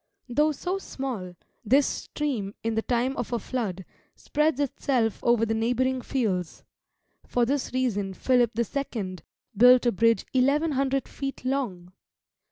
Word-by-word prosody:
Though 300 Hz, +5 st, +3 dB
so 360 Hz, +6 st, -3 dB
small, 235 Hz, -, -5 dB, 0.3 s
this 265 Hz, +6 st, +4 dB
stream 235 Hz, -10 st, -3 dB
in 225 Hz, 0 st, 0 dB
the 225 Hz, -, +1 dB
time 250 Hz, +3 st, 0 dB
of 240 Hz, -, -3 dB
a 240 Hz, -, +1 dB
flood 200 Hz, -6 st, -4 dB, 0.3 s
spreads 300 Hz, -1 st, 0 dB
itself 250 Hz, -5 st, 0 dB
over 235 Hz, -1 st, +3 dB
the 225 Hz, -, -1 dB
neighbouring 250 Hz, +3 st, 0 dB
fields; 200 Hz, -11 st, -2 dB, 0.6 s
for 245 Hz, -1 st, +2 dB
this 275 Hz, +1 st, -1 dB
reason 205 Hz, -7 st, -1 dB
Philip 245 Hz, 0 st, +3 dB
the 235 Hz, -, +2 dB
Second 210 Hz, -, -4 dB, 0.3 s
built 250 Hz, +3 st, +7 dB
a 240 Hz, -, +4 dB
bridge 230 Hz, +3 st, +2 dB
eleven 280 Hz, +5 st, +3 dB
hundred 270 Hz, 0 st, 0 dB
feet 275 Hz, -2 st, -6 dB
long! 205 Hz, -10 st, -2 dB
245 Hz, 145 wpm, -26 LUFS, 220-270 Hz, 0.6 s, built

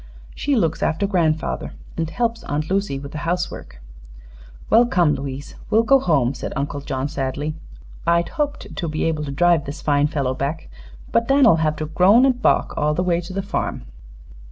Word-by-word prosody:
"She 285 Hz, -1 st, 0 dB
looks 165 Hz, -9 st, 0 dB
after 160 Hz, +6 st, +1 dB
grandfather, 165 Hz, -6 st, 0 dB, 0.2 s
and 165 Hz, -1 st, -2 dB
helps 230 Hz, +3 st, -1 dB
Aunt 150 Hz, +4 st, -3 dB
Lucy 195 Hz, -8 st, 0 dB
with 140 Hz, +1 st, -8 dB
the 150 Hz, -, -5 dB
housework." 170 Hz, -, -3 dB, 0.9 s
"Well, 235 Hz, +2 st, +5 dB
come, 175 Hz, -8 st, +3 dB
Louise; 140 Hz, 0 st, -6 dB, 0.2 s
we'll 225 Hz, +1 st, +4 dB
go 270 Hz, +4 st, +5 dB
home," 140 Hz, -, +2 dB
said -, -, -6 dB
Uncle 140 Hz, +1 st, -3 dB
John, 135 Hz, -1 st, -3 dB
sadly. 145 Hz, +1 st, -3 dB, 0.5 s
"I'd 170 Hz, 0 st, +2 dB
hoped 295 Hz, -3 st, -3 dB
to 175 Hz, -, -3 dB
be 155 Hz, -, -2 dB
able 155 Hz, -2 st, 0 dB
to 140 Hz, -, -5 dB
drive 170 Hz, +2 st, +3 dB
this 145 Hz, +4 st, -7 dB
fine 145 Hz, -1 st, +3 dB
fellow 140 Hz, -4 st, -1 dB
back, 140 Hz, +5 st, -4 dB, 0.4 s
but 230 Hz, -, +2 dB
Dan'll 270 Hz, -9 st, +5 dB
have 155 Hz, -1 st, +1 dB
to 155 Hz, -, -4 dB
groan 190 Hz, -, +5 dB
an' 270 Hz, -, +5 dB
balk 250 Hz, 0 st, +1 dB
all 150 Hz, 0 st, +1 dB
the 180 Hz, -, 0 dB
way 175 Hz, -1 st, +1 dB
to 175 Hz, -, -9 dB
the 195 Hz, +1 st, -3 dB
farm." 200 Hz, -, -3 dB
160 Hz, 185 wpm, -21 LUFS, 145-195 Hz, 0.9 s, Well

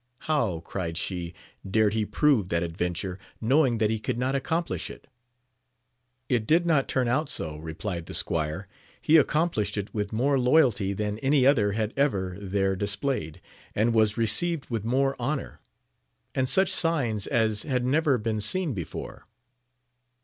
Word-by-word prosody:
How, 115 Hz, -, 0 dB
cried 85 Hz, -1 st, -4 dB
she, 85 Hz, -1 st, -3 dB, 0.3 s
dared 105 Hz, +1 st, +2 dB
he 110 Hz, -1 st, 0 dB
prove 140 Hz, -, +2 dB
that 85 Hz, 0 st, 0 dB
adventure, 90 Hz, +2 st, -3 dB, 0.2 s
knowing 130 Hz, +1 st, +3 dB
that 110 Hz, 0 st, +1 dB
he 110 Hz, -, -1 dB
could 120 Hz, +2 st, -3 dB
not 130 Hz, +2 st, 0 dB
accomplish 160 Hz, +5 st, -2 dB
it -, -, -11 dB, 0.6 s
\ 125 Hz, +1 st, -49 dB
It 110 Hz, -1 st, -6 dB
did 170 Hz, +2 st, +3 dB
not 155 Hz, -5 st, +2 dB
turn 130 Hz, -2 st, 0 dB
out 140 Hz, +5 st, 0 dB
so, 75 Hz, -1 st, -4 dB
replied 80 Hz, +2 st, -5 dB
the -, -, -4 dB
squire; 80 Hz, +5 st, -2 dB, 0.3 s
he 160 Hz, -, +3 dB
accomplished 150 Hz, -8 st, +1 dB
it 100 Hz, 0 st, -4 dB
with 105 Hz, -2 st, -2 dB
more 135 Hz, +5 st, +1 dB
loyalty 125 Hz, -7 st, +3 dB
than 105 Hz, +1 st, -3 dB
any 135 Hz, +1 st, +3 dB
other 110 Hz, -8 st, +4 dB
had 110 Hz, +1 st, -2 dB
ever 100 Hz, -11 st, 0 dB
there 95 Hz, 0 st, 0 dB
displayed, 100 Hz, -, -2 dB, 0.3 s
and 115 Hz, +3 st, +2 dB
was 110 Hz, -1 st, +3 dB
received 135 Hz, +8 st, 0 dB
with 115 Hz, -3 st, -2 dB
more 135 Hz, +4 st, +1 dB
honour, 140 Hz, +3 st, -3 dB, 0.7 s
and 130 Hz, -1 st, 0 dB
such 190 Hz, 0 st, +3 dB
signs 130 Hz, -, +1 dB
as 110 Hz, -5 st, +1 dB
had 125 Hz, -4 st, -1 dB
never 145 Hz, 0 st, +2 dB
been 110 Hz, -1 st, -2 dB
seen 170 Hz, -, +1 dB
before. 85 Hz, -7 st, -7 dB
115 Hz, 155 wpm, -26 LUFS, 100-135 Hz, 0.7 s, other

